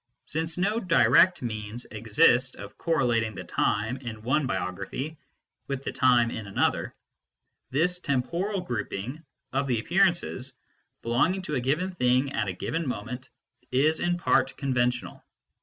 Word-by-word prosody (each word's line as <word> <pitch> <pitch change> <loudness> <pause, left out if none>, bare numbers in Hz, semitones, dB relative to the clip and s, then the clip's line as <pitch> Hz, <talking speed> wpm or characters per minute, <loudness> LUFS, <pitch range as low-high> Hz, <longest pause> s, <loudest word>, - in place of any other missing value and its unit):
Since 160 +2 -2
no 205 +5 +1
direct 165 - +4
means 110 0 -4
exist 115 +4 +3
of 100 0 -10
correlating 120 - +1
the - - -6
time 110 +5 0
in 115 -5 -8
one 135 +4 +1
biography 100 - -4 0.5
with 135 -1 -3
the - - -3
time 125 -2 +4
in 110 -2 -6
another, 100 - 0 0.7
this 170 +7 +1
temporal 175 +7 -1
grouping 125 - -4 0.3
of 140 +1 0
the 120 -4 +1
appearances 170 - +1 0.5
belonging 160 +11 +1
to 155 - -4
a 130 - 0
given 155 +9 0
thing 130 -4 +2
at 110 -2 0
a 95 - -2
given 165 - -3
moment 125 +2 -5 0.4
is 150 +5 +2
in 175 0 +1
part 135 -6 +2
conventional. 125 -3 -1
130 Hz, 140 wpm, -27 LUFS, 115-160 Hz, 0.7 s, direct